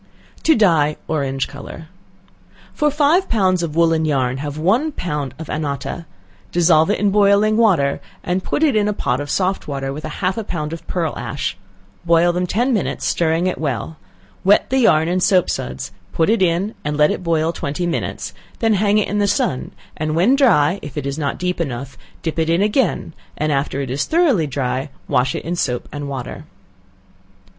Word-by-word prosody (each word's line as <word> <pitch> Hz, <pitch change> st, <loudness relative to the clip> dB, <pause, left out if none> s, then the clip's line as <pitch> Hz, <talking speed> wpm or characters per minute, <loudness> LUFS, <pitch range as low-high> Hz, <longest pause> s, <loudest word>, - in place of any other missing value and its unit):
To 320 Hz, -, +6 dB
Dye 160 Hz, -, +3 dB
Orange 135 Hz, -3 st, -1 dB
Color. 140 Hz, +3 st, -9 dB, 0.9 s
For 300 Hz, -, +2 dB
five 300 Hz, +6 st, +2 dB
pounds 185 Hz, -5 st, +2 dB
of 160 Hz, -3 st, -3 dB
woolen 165 Hz, -1 st, +3 dB
yarn, 130 Hz, -4 st, 0 dB
have 145 Hz, +1 st, -5 dB
one 225 Hz, -, +2 dB
pound 150 Hz, -, -4 dB
of 160 Hz, -1 st, -8 dB
annotta; 150 Hz, +2 st, -4 dB, 0.4 s
dissolve 170 Hz, -1 st, +4 dB
it 205 Hz, -, +2 dB
in 205 Hz, -1 st, +2 dB
boiling 205 Hz, +1 st, +4 dB
water, 190 Hz, -12 st, +3 dB, 0.2 s
and 185 Hz, +1 st, -1 dB
put 310 Hz, -, -1 dB
it 295 Hz, -6 st, +3 dB
in 210 Hz, -1 st, +2 dB
a 210 Hz, -, +1 dB
pot 135 Hz, -7 st, -1 dB
of 145 Hz, -, -6 dB
soft 190 Hz, +3 st, 0 dB
water 135 Hz, -2 st, -3 dB
with 150 Hz, +2 st, -7 dB
half 190 Hz, +3 st, -2 dB
a -, -, -3 dB
pound 155 Hz, -5 st, -4 dB
of 165 Hz, -, -9 dB
pearl 165 Hz, -4 st, -2 dB
ash; 140 Hz, -, -3 dB, 0.5 s
boil 170 Hz, 0 st, +4 dB
them 180 Hz, +1 st, -1 dB
ten 245 Hz, +8 st, +1 dB
minutes, 210 Hz, -, -1 dB
stirring 165 Hz, +1 st, +1 dB
it 185 Hz, -, -1 dB
well; 145 Hz, +1 st, -3 dB, 0.5 s
wet 200 Hz, +5 st, +4 dB
the 265 Hz, -, +3 dB
yarn 160 Hz, -10 st, +4 dB
in 180 Hz, +2 st, +1 dB
soap 185 Hz, -1 st, +3 dB
suds; 65 Hz, +1 st, -4 dB, 0.2 s
put 165 Hz, +5 st, +2 dB
it 230 Hz, -, +1 dB
in, 185 Hz, +4 st, +1 dB
and 150 Hz, 0 st, -2 dB
let 150 Hz, 0 st, +4 dB
it -, -, -3 dB
boil 165 Hz, -2 st, +1 dB
twenty 150 Hz, +4 st, -3 dB
minutes; 170 Hz, -1 st, -3 dB, 0.2 s
then 225 Hz, -1 st, +2 dB
hang 205 Hz, +1 st, +2 dB
it 210 Hz, -, +2 dB
in 210 Hz, -, -1 dB
the 205 Hz, -, +2 dB
sun, 130 Hz, -8 st, 0 dB, 0.3 s
and 155 Hz, 0 st, -2 dB
when 195 Hz, +11 st, +4 dB
dry, 200 Hz, -, +4 dB
if 145 Hz, -, -9 dB
it 145 Hz, -, -3 dB
is 140 Hz, +2 st, -3 dB
not 140 Hz, -2 st, -2 dB
deep 180 Hz, -1 st, -2 dB
enough, 135 Hz, -2 st, -4 dB, 0.3 s
dip 165 Hz, 0 st, -2 dB
it 160 Hz, 0 st, +1 dB
in 170 Hz, +4 st, +3 dB
again; 210 Hz, -, 0 dB, 0.2 s
and 155 Hz, 0 st, 0 dB
after 140 Hz, 0 st, -1 dB
it 135 Hz, -2 st, -4 dB
is 140 Hz, +3 st, -1 dB
thoroughly 295 Hz, -, +2 dB
dry, 130 Hz, 0 st, -2 dB, 0.2 s
wash 130 Hz, +1 st, +1 dB
it -, -, -5 dB
in 170 Hz, +2 st, -2 dB
soap 125 Hz, -7 st, -2 dB
and 145 Hz, -1 st, -5 dB
water. 130 Hz, -3 st, -6 dB
165 Hz, 195 wpm, -19 LUFS, 145-200 Hz, 0.9 s, To